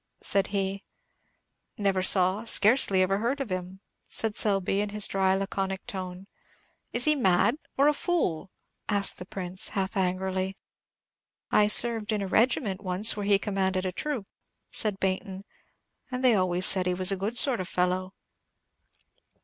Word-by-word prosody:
said 195 -1 +1
he. 195 0 -3 0.9
"Never 195 -3 0
saw, 185 +2 +3
scarcely 210 -3 +3
ever 195 +2 0
heard 245 +6 -1
of 265 -8 -5
him," 185 +1 -5 0.3
said 220 -2 -1
Selby, 195 -1 +1
in 210 - -3
his 210 0 0
dry, 190 -1 +1
laconic 195 0 -3
tone. 185 -1 -7 0.7
"Is 240 - -1
he 305 - +4
mad, 235 0 +2 0.2
or 280 +2 +4
a 300 - +4
fool?" 240 - -2 0.4
asked 200 -2 +1
the 180 - -9
Prince, 185 -1 -3
half 195 +1 -3
angrily. 190 0 -2 0.9
"I 210 - +4
served 225 0 +4
in 210 -2 -1
a - - -4
regiment 215 -2 0
once 190 +4 +1
where 205 -1 -4
he 200 -1 +4
commanded 190 -2 -2
a 185 - -1
troop," 265 - -4 0.5
said 210 -3 0
Baynton; 190 +1 -3 0.6
"and 255 -1 -4
they 250 -2 +5
always 185 -2 +1
said 185 -1 +5
he 180 - 0
was 185 +1 +3
a - - 0
good 205 +5 -2
sort 255 -2 +3
of 185 - -4
fellow." 185 +1 -1
195 Hz, 155 wpm, -27 LUFS, 185-215 Hz, 0.9 s, they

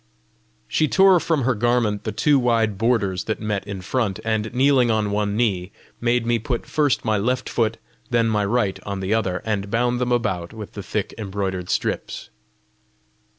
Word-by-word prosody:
She 155 - +1
tore 190 +2 +5
from 160 -4 0
her 130 +2 +2
garment 115 -2 0
the - - -1
two 145 -2 +3
wide 115 -4 +2
borders 100 -6 +1
that 110 - -2
met 105 -2 -3
in 100 -2 -5
front, 100 -1 -1
and 110 -1 -1
kneeling 130 -1 +3
on 110 -2 +1
one 105 0 0
knee, 100 -5 0 0.3
made 120 0 +1
me 120 0 +1
put 120 +2 -3
first 145 -6 +1
my 110 -2 +2
left 125 +4 -1
foot, 115 -1 0 0.3
then 115 -1 +2
my 105 -2 +1
right 100 -2 0
on 100 -1 -4
the 95 +3 0
other, 95 -5 -1
and 105 -2 -2
bound 120 +2 0
them 125 0 0
about 95 -8 -1
with 110 -2 -8
the 100 - -7
thick 100 +2 -3
embroidered 95 -3 -3
strips. - - -2
110 Hz, 180 wpm, -22 LUFS, 100-120 Hz, 0.3 s, tore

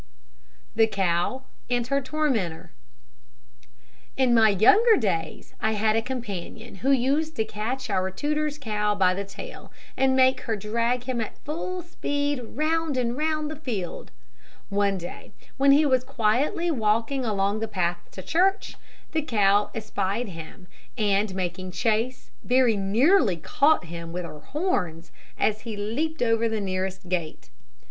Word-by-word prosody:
THE 225 0 +5
COW 195 +5 0 0.3
AND 245 -1 +1
HER 275 +2 0
TORMENTOR. 230 - -1 1.5
In 260 -2 +3
my 225 -2 +6
younger 415 - +6
days, 190 -8 -2
I 220 - +1
had 215 +1 +2
a 225 - +2
companion 225 -3 -6
who 260 +8 -1
used 275 +4 +2
to 220 - 0
catch 235 +5 -4
our 190 -3 0
tutor's 300 +7 -1
cow 210 -6 -1
by 185 -2 +3
the 200 +2 -3
tail, 200 - -10 0.2
and 265 0 +3
make 260 0 +4
her 225 -3 -2
drag 230 +4 -1
him 250 -2 -2
at 220 - -5
full 345 +4 -4
speed 290 -4 -2
round 310 +3 -1
and 240 -1 0
round 305 +1 -1
the - - -5
field. 230 - -5 0.6
One 200 -1 +1
day, 175 -1 -9 0.2
when 275 +1 +5
he 295 +2 +6
was 260 -3 +3
quietly 260 - +1
walking 230 +1 +1
along 205 -2 0
the 225 - -2
path 175 -4 -1
to 190 - -8
church, 380 - +1 0.3
the 315 - +1
cow 205 -6 +3
espied 215 0 -2
him, 165 +2 -10 0.3
and 205 -2 +1
making 185 0 -4
chase, 230 +4 -1
very 250 -2 +3
nearly 215 - +3
caught 280 - +2
him 170 0 -7
with 180 +1 -4
her 150 - -9
horns 180 - -2 0.3
as 215 0 +1
he 225 -3 -6
leaped 275 +9 -2
over 230 -1 +2
the 220 -1 -1
nearest 190 -1 -3
gate. 170 - -4
225 Hz, 150 wpm, -25 LUFS, 195-275 Hz, 1.5 s, my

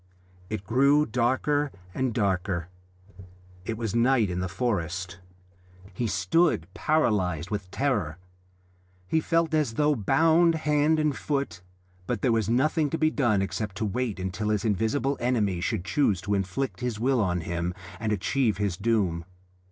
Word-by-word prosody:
It 110 -3 -4
grew 140 +8 +4
darker 130 +5 +1 0.2
and 130 -1 0
darker. 95 -5 -1 1.0
It 110 +1 -3
was 115 -3 -3
night 120 -4 +3
in 90 - -2
the 90 0 -2
forest. 90 -5 -2 0.7
He 120 +5 -2
stood 105 - +2
paralysed 95 - 0
with 100 -3 -3
terror; 105 - -1 0.9
he 160 - +2
felt 165 0 +1
as 150 -7 +1
though 150 +2 +3
bound 165 - +3
hand 150 0 +2
and 150 -2 +1
foot, 135 - -3 0.5
but 120 -4 -2
there 125 - +3
was 110 -3 +1
nothing 150 +5 +2
to 165 - -2
be 155 0 +2
done 110 -10 +2
except 100 0 -4
to 110 - -2
wait 110 0 -2
until 95 +3 -3
his 105 0 0
invisible 115 +7 0
enemy 105 -8 0
should 95 -2 -2
choose 105 -5 +1
to 105 - -2
inflict 100 +7 -2
his 125 -4 -3
will 130 +1 +2
on 90 -3 0
him 85 +1 -2 0.3
and 110 -1 -1
achieve 105 +2 +1
his 100 -4 -1
doom. 100 -6 0
110 Hz, 150 wpm, -27 LUFS, 95-140 Hz, 1.0 s, grew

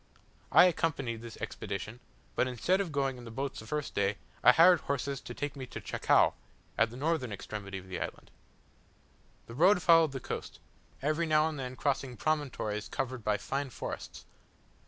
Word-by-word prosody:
I - - +8
accompanied 135 -10 0
this 115 -1 -9
expedition, 105 +1 -5 0.4
but - - +2
instead 175 - +1
of 180 -5 -3
going 135 -3 -1
in - - -10
the 115 - -8
boats 135 +4 -4
the 110 - -10
first 150 +3 -3
day, 100 0 +1 0.3
I - - +9
hired 170 +5 +7
horses 140 -1 -2
to - - -8
take 145 0 -4
me 130 -2 -6
to - - -7
Chacao, - - +3 0.4
at 115 - +3
the 120 - -10
northern 145 -4 0
extremity 100 -1 -6
of 95 0 -10
the 95 - -4
island. - - -6 1.1
The 115 - -10
road 180 - +5
followed 165 -4 +6
the 135 - -3
coast; - - -6 0.5
every 155 +3 +1
now 155 0 +4
and 155 -3 -4
then 130 -1 -5
crossing 135 -2 -1
promontories 130 -9 -1
covered 130 -3 -3
by 105 -1 +1
fine 135 +5 -3
forests. - - -7
135 Hz, 175 wpm, -31 LUFS, 115-155 Hz, 1.1 s, I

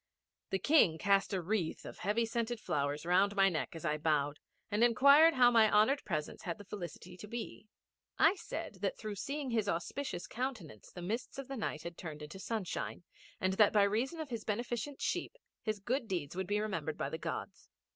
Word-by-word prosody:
The 195 - +1
King 190 - +4
cast 195 +4 +2
a 190 -3 -1
wreath 185 -3 -1
of - - -9
heavy 215 +4 +1
scented 230 +1 -2
flowers 145 -3 -1
round 190 +4 +3
my 195 -1 +5
neck 165 -1 -3
as 165 - -7
I 150 -1 0
bowed, 150 -2 +1 0.3
and 210 +3 +2
inquired 280 +7 +7
how 245 -2 +6
my 225 -2 +5
honoured 220 +7 +4
presence 150 -1 -3
had 170 - -4
the 205 - -11
felicity 180 -2 -7
to 210 - -9
be. 230 -1 -6 0.5
I 325 - +6
said 395 - -6
that - - -1
through 215 -1 -5
seeing 275 +6 -4
his 220 -3 +1
auspicious 175 +3 -3
countenance 220 - -5
the 175 - -8
mists 225 +10 -3
of 275 -2 -6
the 275 - -5
night 185 - -3
had 170 0 -7
turned 155 -3 -7
into 160 +6 -9
sunshine, 195 -4 -3 0.4
and 185 0 +1
that 205 +1 +5
by 205 -2 +5
reason 230 +11 0
of 305 -4 -5
his 230 -3 -3
beneficent 240 +5 -3
sheep - - -2 0.2
his 215 -1 -2
good 240 +5 -2
deeds 175 -6 -3
would 190 0 -2
be 205 +1 +1
remembered 165 -8 -2
by 135 - -2
the 160 - -4
Gods. - - -5
205 Hz, 200 wpm, -34 LUFS, 175-240 Hz, 0.5 s, inquired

